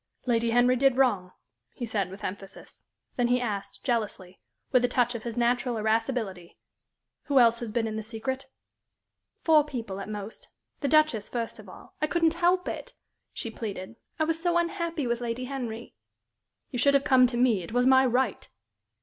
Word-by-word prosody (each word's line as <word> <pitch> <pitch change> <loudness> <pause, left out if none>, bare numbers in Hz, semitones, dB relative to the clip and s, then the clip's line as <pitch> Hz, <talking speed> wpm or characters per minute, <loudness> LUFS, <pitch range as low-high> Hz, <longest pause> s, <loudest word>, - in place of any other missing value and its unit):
"Lady 235 -2 +1
Henry 245 +2 +4
did 265 0 +3
wrong," 205 -9 +2 0.4
he 245 - -4
said, 205 -5 -1
with 190 +2 -11
emphasis. 195 +1 -8 0.4
Then 245 -1 +2
he 250 +1 +2
asked, 210 -5 -4
jealously, 210 -7 -2 0.3
with 255 -3 +4
a - - +4
touch 245 0 +1
of 235 - -5
his 235 +1 -6
natural 240 0 +1
irascibility, 220 -5 -1 0.7
"Who 285 -2 +1
else 235 -2 +6
has 235 -3 -5
been 230 0 0
in 220 -1 -3
the - - -2
secret?" 260 +5 -4 1.0
"Four 315 -2 +6
people, 230 -9 -5
at 195 - -6
most 210 0 -6 0.3
the 285 - -1
Duchess, 305 -8 +3
first 230 -2 -4
of 205 -3 -12
all. - - -14
I 305 - +2
couldn't 330 0 +2
help 355 +1 +2
it," - - -6 0.4
she 230 - -5
pleaded. 205 -2 -6 0.2
"I 315 - +1
was 325 +1 -1
so 345 -1 +2
unhappy 340 -3 -1
with 235 0 -1
Lady 240 +1 -3
Henry." 245 -4 -5 0.8
"You 250 - -3
should 280 +3 +5
have 275 - +3
come 255 -3 +5
to 240 -1 -3
me. 240 -6 +3
It 170 - -9
was 245 +2 +2
my 260 0 +6
right." 250 -2 0
240 Hz, 185 wpm, -27 LUFS, 220-270 Hz, 1.0 s, else